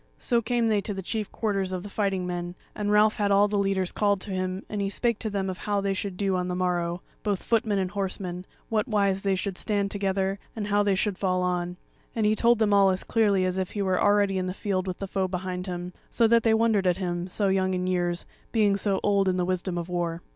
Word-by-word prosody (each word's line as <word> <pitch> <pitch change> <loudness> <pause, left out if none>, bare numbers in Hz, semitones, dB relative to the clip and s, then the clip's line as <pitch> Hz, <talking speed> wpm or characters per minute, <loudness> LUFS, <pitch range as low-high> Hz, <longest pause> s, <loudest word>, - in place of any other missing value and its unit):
So 240 -2 +2
came 235 +1 0
they 215 -2 +2
to 205 0 -3
the 190 - -5
chief 215 +2 -3
quarters 195 -4 -1
of 185 -1 -3
the - - -7
fighting 195 -3 -1
men, 175 0 -4 0.2
and 205 -1 -2
Ralph 210 +1 +4
had 205 -2 +1
all 200 +1 +5
the 205 0 0
leaders 195 -2 0
called 205 -2 +1
to 200 - -5
him, 185 +1 -2
and 210 -1 -3
he 195 - 0
spake 235 +2 0
to 220 - -3
them 200 -2 -2
of 185 -1 -4
how 205 -1 0
they 200 0 0
should 195 -1 -4
do 195 -1 +1
on 180 0 -1
the 180 - -2
morrow, 175 -1 -1 0.2
both 205 -3 -1
footmen 225 -3 +1
and 185 -1 -1
horsemen, 185 -2 -4 0.2
whatwise 210 -4 +1
they 195 -1 +1
should 190 0 -3
stand 200 -2 0
together, 195 -1 -1 0.2
and 215 -2 -3
how 205 0 +3
they 200 -1 +2
should 195 0 -1
fall 185 -2 +1
on; 180 0 -1 0.4
and 220 -2 +1
he 215 +1 +3
told 235 +1 +4
them 210 -2 +2
all 200 -1 +6
as 185 0 -1
clearly 205 -5 +2
as 185 +1 -1
if 185 - -3
he 205 - -1
were 185 -1 +1
already 205 -2 +3
in 185 - -2
the 185 - -4
field 190 -3 -2
with 185 - -3
the 195 - -5
foe 190 0 -1
before 185 0 -4
him; 180 -1 -5 0.2
so 235 - +2
that 230 +1 +5
they 225 0 +3
wondered 220 -4 +2
at 180 0 +2
him, 175 -2 -2
so 195 +2 0
young 190 -1 +1
in 180 0 -1
years, 175 -1 -1 0.3
being 210 -3 +3
so 200 -1 0
old 200 -1 +3
in 185 - 0
the 180 - +1
wisdom 185 0 -2
of 170 -1 -3
war. 175 -1 -2
195 Hz, 255 wpm, -26 LUFS, 185-205 Hz, 0.4 s, all